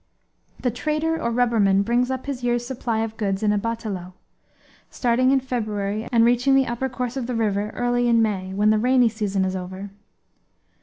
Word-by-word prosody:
The 250 - 0
trader 305 +6 -1
or 235 - 0
rubberman 225 -5 +3
brings 240 +2 +1
up 260 -1 -3
his 270 -3 -5
year's 240 0 0
supply 240 -3 -2
of 225 0 -4
goods 200 -1 -1
in 210 -1 +3
a 205 - +1
batelao, 205 -5 -4 0.8
starting 250 +1 +1
in 270 0 +4
February 215 -4 -3
and 230 -2 +4
reaching 245 +3 +3
the 270 -1 +4
upper 240 +2 -2
course 250 -1 -4
of 255 -3 -3
the 250 - -2
river 210 -2 0
early 245 0 +1
in 235 -1 +4
May, 195 -4 0
when 205 +2 +2
the 215 - +3
rainy 250 0 +4
season 205 -3 -1
is 185 0 -2
over. 190 +2 -6
230 Hz, 190 wpm, -23 LUFS, 205-250 Hz, 0.8 s, in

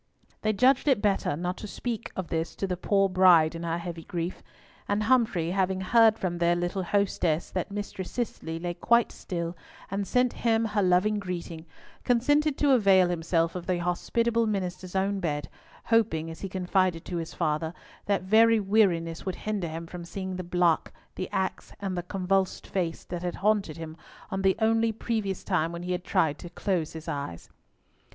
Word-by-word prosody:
They 215 - +2
judged 255 +7 +3
it 270 -6 +4
better 200 -7 +1
not 180 +3 -3
to 210 - -7
speak 230 +2 -4
of 185 -2 -4
this 165 0 -2
to - - -2
the 185 -2 -2
poor 195 +2 +2
bride 180 -4 +5
in 165 - -6
her 170 0 -1
heavy 170 -1 -6
grief; 175 +2 -4 0.5
and 205 +1 +1
Humfrey, 215 -9 +2
having 190 0 0
heard 225 +2 +5
from 175 -4 -2
their 170 0 +3
little 175 +2 -1
hostess 180 -4 0
that 185 - -2
Mistress 200 -2 -5
Cicely 180 -9 -4
lay 175 +1 -3
quite 235 +7 +3
still, 170 -1 -4 0.4
and 195 0 -2
sent 250 -1 +2
him 225 -1 +2
her 210 -1 0
loving 190 +3 +3
greeting, 170 -3 -6 0.4
consented 290 +5 +2
to 290 -2 +3
avail 195 -7 +5
himself 165 -1 0
of 180 -2 -6
the 180 -1 +1
hospitable 230 +6 0
minister's 185 -2 -3
own 195 +1 +1
bed, 150 -6 -2 0.4
hoping, 195 -9 +1
as 160 - -10
he 195 - -4
confided 185 -2 0
to 175 - -4
his 165 -1 -5
father, 155 +1 0 0.4
that 200 -2 +1
very 225 +3 +5
weariness 190 -6 +2
would 185 - -1
hinder 210 -5 -3
him 165 +1 -6
from 175 +1 -8
seeing 190 +2 -5
the 185 - -4
block, 175 -2 +1 0.2
the 185 - -5
axe, 190 0 -3
and 195 -2 -3
the 175 - -1
convulsed 190 +1 -1
face, 175 -4 -2
that 175 -1 -5
had 175 -1 -3
haunted 200 -6 +1
him 160 -1 -7 0.4
on 190 -1 -1
the 190 -1 +3
only 225 0 +2
previous 215 -3 -2
time 170 -4 0
when 170 0 -6
he 180 - -3
had 180 0 -2
tried 150 -5 +1
to 175 - -8
close 170 -4 -2
his 160 0 -9
eyes. 140 - -5
185 Hz, 185 wpm, -27 LUFS, 170-205 Hz, 0.5 s, bride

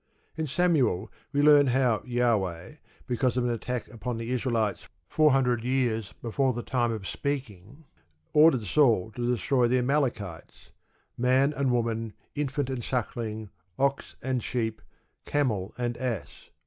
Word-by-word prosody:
_ - - -49 0.3
In 160 -1 -2
Samuel 140 - +1 0.2
we 145 +1 +1
learn 145 -1 +7
how 125 -3 +2
Jahweh, 110 - 0 0.3
because 125 +1 0
of 125 - +2
an 120 - +1
attack 120 +1 -3
upon 120 0 -5
the 115 +1 -4
Israelites 115 -4 -1 0.2
four 155 -1 +4
hundred 125 -4 +2
years 120 -5 0
before 130 +3 +1
the 120 0 -4
time 120 -2 0
of 110 -4 -5
speaking, 135 - -5 0.5
ordered 150 -6 +6
Saul 110 -3 +3
to 120 +2 -1
destroy 125 +2 +2
the 125 +2 +2
Amalekites, 125 - -2 0.5
"man 130 +4 +3
and 140 -2 0
woman, 115 -2 -1 0.2
infant 140 -2 -2
and 125 -3 -4
suckling, 110 -4 -3 0.3
ox 140 0 0
and 130 -2 -1
sheep, 110 -3 -2 0.4
camel 110 -10 0
and 120 -1 -2
ass." 120 -6 -5
125 Hz, 145 wpm, -27 LUFS, 115-135 Hz, 0.5 s, learn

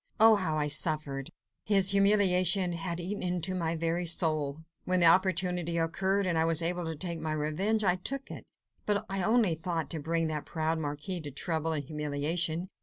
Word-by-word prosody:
Oh, 220 0 +7
how 160 -5 -2
I 150 -1 0
suffered! 150 -3 0 0.3
his 195 -2 +3
humiliation 195 -3 +4
had 170 +1 -4
eaten 190 +4 -4
into 180 0 -1
my 170 -2 -2
very 165 +2 -1
soul! 155 -3 +1 0.2
When 185 0 0
the 170 - +5
opportunity 180 -1 +2
occurred, 190 +4 0
and 170 -3 0
I 160 - +2
was 165 0 +2
able 175 +1 -1
to 160 0 -4
take 170 +1 -4
my 155 -1 -3
revenge, 175 +9 -1
I 180 -2 +2
took 275 +9 -4
it. - - -8 0.4
But 205 -1 0
I 195 0 -3
only 220 -2 +2
thought 165 0 -4
to 160 - -2
bring 165 +2 -1
that 155 -2 -4
proud 160 0 -2
marquis 150 +4 -4
to 150 - -7
trouble 160 +3 -2
and 145 -2 -3
humiliation. 155 +4 -2
170 Hz, 185 wpm, -29 LUFS, 155-185 Hz, 0.4 s, Oh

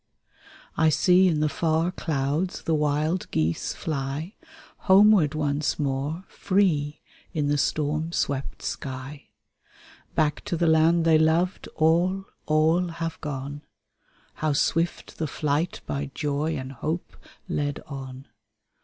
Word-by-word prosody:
I 160 - +4
see 180 +4 +5
in 155 -4 +1
the 155 - +3
far 160 +3 +1
clouds 155 +1 -2
the 165 - 0
wild 150 +3 0
geese 80 +1 -1
fly. 150 +4 -3 0.6
Homeward 190 -6 +6
once 145 -1 0
more, 145 +4 -2
free, 165 -7 0 0.3
in 150 -3 0
the 145 - +2
storm 155 +3 0
swept 140 -4 -2
sky. 135 +2 -6 0.9
Back 150 -2 +1
to 170 - -2
the 170 - +1
land 160 +1 +4
they 160 -1 +5
loved, 165 +4 +1
all, 175 +5 +2 0.2
all, 160 +4 +3
have 165 -1 -5
gone, 145 -1 -5 0.7
How 155 -1 -1
swift 165 +4 -1
the 160 - 0
flight 150 +4 -1
by 140 0 -3
joy 150 +1 -1
and 130 0 -6
hope 155 +6 -4 0.3
led 145 -5 -2
on. 135 -2 -8
155 Hz, 125 wpm, -25 LUFS, 145-165 Hz, 0.9 s, Homeward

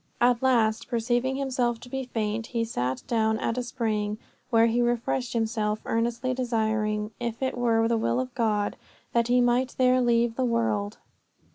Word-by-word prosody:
At 245 -1 +3
last, 230 -4 +2
perceiving 240 +2 0
himself 250 -4 -1
to - - -11
be 265 +1 -4
faint, 225 -2 -2
he 230 -2 -1
sat 130 - -2
down 220 -2 +1
at 230 - -1
a - - 0
spring, 215 -4 -2 0.3
where 230 -2 +5
he 230 +1 +2
refreshed 240 +1 0
himself, 220 -2 0
earnestly 235 +3 0
desiring, 220 -3 -1
if 235 +1 -3
it 260 - -1
were 230 -2 +2
the 230 -1 +1
will 115 - +1
of 130 0 -4
God, 210 -3 0 0.4
that 235 -1 +2
he 245 0 +4
might 245 +1 +1
there 255 0 +4
leave 235 -1 +2
the 260 - +1
world. 225 -4 0
230 Hz, 170 wpm, -26 LUFS, 220-245 Hz, 0.4 s, where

